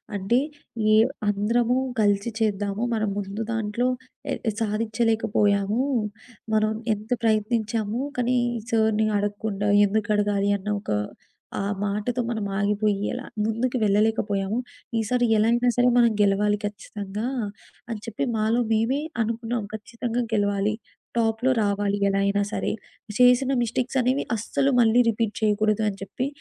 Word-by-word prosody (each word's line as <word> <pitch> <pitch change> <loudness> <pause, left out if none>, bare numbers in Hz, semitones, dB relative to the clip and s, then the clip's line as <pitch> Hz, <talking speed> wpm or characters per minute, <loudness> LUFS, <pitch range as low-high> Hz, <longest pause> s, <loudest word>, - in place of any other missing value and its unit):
అంటే, 200 +5 +1 0.6
ఏవ్ 220 +4 +5 0.2
అందరము 230 +4 +1 0.2
కలిసి 205 +1 +2
చేద్దాము. 205 0 0
మనం 215 -2 0
ముందు 200 +2 -4
దాంట్లో 225 +2 -1 0.5
ఎ - - 0 0.3
సాధిచ్చలేకపోయాము. 215 -1 +1 0.7
మనం 215 0 +3 0.2
ఎంత 215 +2 -8
ప్రయత్నించాము 220 0 0 0.2
కానీ, 250 0 +1 0.3
సర్‌ని 220 -1 +2
అడగకుండా, 205 0 -2 0.2
ఎందుకడగాలి 205 -1 +1
అన్న 210 - -6
ఒక - - -10 0.7
ఆ - - 0 0.2
మాటతో 210 +5 -1
మనమాగిపొయ్యి 205 -1 0
అలా 250 +1 -5 0.2
ముందుకి 240 +3 0
వెళ్ళలేకపోయాము. 205 -1 +1 0.4
ఈసారి 245 +3 +1
ఎలా 215 - +3
అయినా 240 +1 +3
సరే! 245 0 +4
మనం 235 -2 +5
గెలవాలి 205 +1 +3
ఖచ్చితంగా 205 0 -5 0.6
అని 220 -2 -3
చెప్పి 230 +3 -3
మాలో 220 +2 +1
మేమే 225 +5 +2 0.2
అనుకున్నాం. 230 +1 -2
ఖచ్చితంగా 230 +2 -3
గెలవాలి, 205 0 +1 0.4
టాప్‌లో 225 +3 +2
రావాలి 200 0 0
ఎలా 195 - +1
అయినా 205 0 +2
సరే! - - -1
ఇప్పుడు 210 -2 -14
చేసిన 250 +2 +5
మిస్టేక్సనేవి 255 +3 0
అస్సలు 270 +5 0
మళ్ళీ 230 +1 +5
రిపీట్ 225 -1 -1
చెయకూడదు 215 0 +2
అని 195 - -7
చెప్పి, 260 +6 -3
215 Hz, 120 wpm, -25 LUFS, 205-235 Hz, 0.7 s, ఏవ్